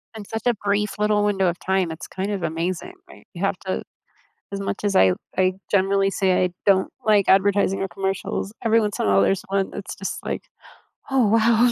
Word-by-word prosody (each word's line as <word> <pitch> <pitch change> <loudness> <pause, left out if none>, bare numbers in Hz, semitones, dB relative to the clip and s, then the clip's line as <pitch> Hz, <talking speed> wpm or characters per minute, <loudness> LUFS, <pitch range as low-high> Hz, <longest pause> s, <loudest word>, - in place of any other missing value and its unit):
In 215 -2 -8
such 225 +1 -5
a 245 - +4
brief 205 0 -1
little 210 0 +2
window 195 -2 +2
of 175 0 -1
time, 190 -3 0
it's 160 - -8
kind 195 +2 -4
of 195 -3 -3
amazing, 170 - -3
right? - - -16
You - - -8
have - - +1
to - - -3 0.7
As 200 - -4
much 200 - -4
as 200 -1 +1
I 95 - +6
w - - -1 0.2
I 185 0 +3 0.2
generally 195 0 +3
say 185 -2 +2
I - - -1 0.2
don't 190 -2 +3 0.2
like 210 -2 +4
advertising 195 0 +3
or 195 - -2
commercials, 195 +2 -3
every 225 0 +4
once 210 -1 -2
in - - +1
a 100 -1 +4
there's 190 - +1
one 195 0 0
that's 200 - -6
just 195 - -4
like, - - -3 0.7
"Oh, 265 -3 +4
wow." 230 +2 +4
195 Hz, 210 wpm, -23 LUFS, 185-210 Hz, 0.7 s, I